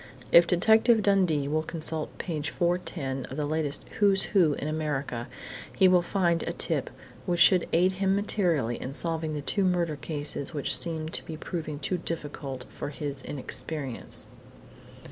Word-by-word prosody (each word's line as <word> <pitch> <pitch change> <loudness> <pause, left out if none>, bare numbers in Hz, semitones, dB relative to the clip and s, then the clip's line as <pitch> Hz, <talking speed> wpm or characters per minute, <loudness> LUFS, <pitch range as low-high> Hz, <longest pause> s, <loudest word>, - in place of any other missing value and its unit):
"If 170 0 +8
Detective 220 +5 +4
Dundee 180 -8 +2
will 155 +2 +1
consult 160 -1 -3
page 155 -3 -3
410 170 -6 -2
of 135 - -8
the 150 - -1
latest 150 -1 -1
WHO'S 195 -2 +4
WHO 175 -7 +5
IN 145 - -4
AMERICA, 145 -6 -3 0.5
he 190 - +5
will 180 -1 +5
find 175 -2 +1
a - - -3
tip - - -1 0.4
which 175 -1 0
should 180 +1 +6
aid 180 +3 +4
him 190 +1 +1
materially 175 - 0
in 130 - -5
solving 160 0 0
the 150 - -3
two 200 +7 0
murder 175 -4 +1
cases 145 0 -4
which 145 - +2
seem 160 -2 -1
to - - -2
be 160 - -7
proving 155 -2 -5
too 175 +5 -2
difficult 145 -6 -4
for - - -5
his 145 -2 -3
inexperience." 140 0 -4
160 Hz, 160 wpm, -27 LUFS, 145-180 Hz, 0.5 s, If